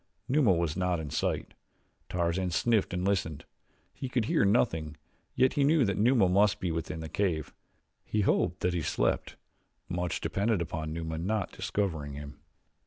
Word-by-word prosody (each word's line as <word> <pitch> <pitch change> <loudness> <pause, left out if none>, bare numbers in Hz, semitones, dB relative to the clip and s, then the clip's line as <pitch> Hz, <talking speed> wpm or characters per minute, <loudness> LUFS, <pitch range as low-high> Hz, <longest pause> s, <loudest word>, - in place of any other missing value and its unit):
Numa 135 -6 +4
was 85 -3 +1
not 90 -2 0
in 75 -3 -6
sight. - - -1 0.6
Tarzan 90 +1 0
sniffed 110 +5 +2
and 90 0 -2
listened. 95 -7 -1 0.5
He 130 - -5
could 120 -3 0
hear - - +2
nothing, 80 -7 +1 0.4
yet 130 +1 +3
he 145 - +2
knew 145 -2 +4
that 100 -2 0
Numa 110 -1 +4
must 105 +3 +3
be 90 -2 -1
within 80 0 -4
the 80 - -5
cave. 80 -3 -1 0.5
He 105 - -1
hoped 90 -2 +1
that 90 - +1
he 85 - 0
slept - - 0 0.5
much 90 0 -2
depended 105 +1 0
upon 80 -1 -3
Numa 80 0 -4
not 100 +3 -1
discovering 80 -8 -2
him. 70 +1 -9
90 Hz, 165 wpm, -29 LUFS, 80-105 Hz, 0.6 s, Numa